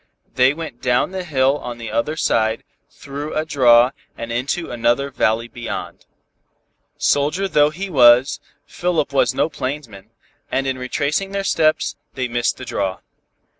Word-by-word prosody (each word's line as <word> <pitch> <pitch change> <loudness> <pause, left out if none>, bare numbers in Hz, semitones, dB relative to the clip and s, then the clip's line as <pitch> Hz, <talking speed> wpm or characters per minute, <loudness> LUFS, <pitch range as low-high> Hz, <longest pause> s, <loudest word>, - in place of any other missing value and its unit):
They 130 +1 +4
went 150 -5 -7
down 125 +7 +1
the 190 -1 -4
hill 140 -3 +1
on 120 -1 -6
the 115 -2 -7
other 115 +8 -1
side, 110 -5 +1 0.3
through 145 +2 -7
a 155 - 0
draw 125 -4 +5 0.3
and 115 0 -6
into 135 +8 -2
another 120 +4 +1
valley 115 -2 +1
beyond. 120 +1 -7 0.9
Soldier 150 +7 +1
though 150 -5 +4
he 185 +6 -5
was, 130 -3 +5 0.3
Philip 170 -5 -1
was 135 - +2
no - - +2
plainsman, 130 -9 -6 0.4
and 135 - 0
in 130 -1 -2
retracing 150 +9 -2
their 200 0 -1
steps, 155 -4 +1 0.2
they 130 -1 -1
missed 120 0 -1
the 130 - -8
draw. 95 -5 -3
135 Hz, 150 wpm, -20 LUFS, 120-155 Hz, 0.9 s, draw